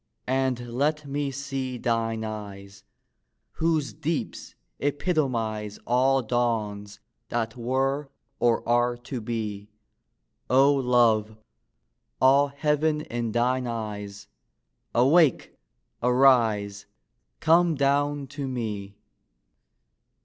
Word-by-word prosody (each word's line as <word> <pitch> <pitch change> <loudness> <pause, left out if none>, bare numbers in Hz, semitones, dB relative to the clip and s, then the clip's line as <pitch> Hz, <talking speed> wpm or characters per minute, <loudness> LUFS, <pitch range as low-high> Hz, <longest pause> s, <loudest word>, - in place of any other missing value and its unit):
and 130 -2 -1
let 145 +5 -1
me 140 0 -2
see 135 -1 -4
Thine 115 -2 -1
eyes, 100 -2 -8 0.7
whose 160 -3 0
deeps 155 +1 -4 0.2
epitomize 125 - -1
All 130 +2 +2
dawns 105 -4 -2 0.3
that 115 -1 -2
were 135 +4 -1 0.3
or 120 -1 +1
are 120 0 +2
to 120 0 -6
be, 105 -2 -4 0.8
O 135 +3 +5
love, 120 -5 +2 0.8
all 140 +2 +5
Heaven 150 +2 0
in 120 -5 -3
thine 125 +1 +1
eyes! 105 -3 -6 0.7
Awake! 140 +4 +3 0.5
arise! 115 -5 +3 0.5
come 170 0 +4
down 145 +1 +1
to 140 +1 -6
me! 105 -6 -4
125 Hz, 90 wpm, -26 LUFS, 110-140 Hz, 0.8 s, O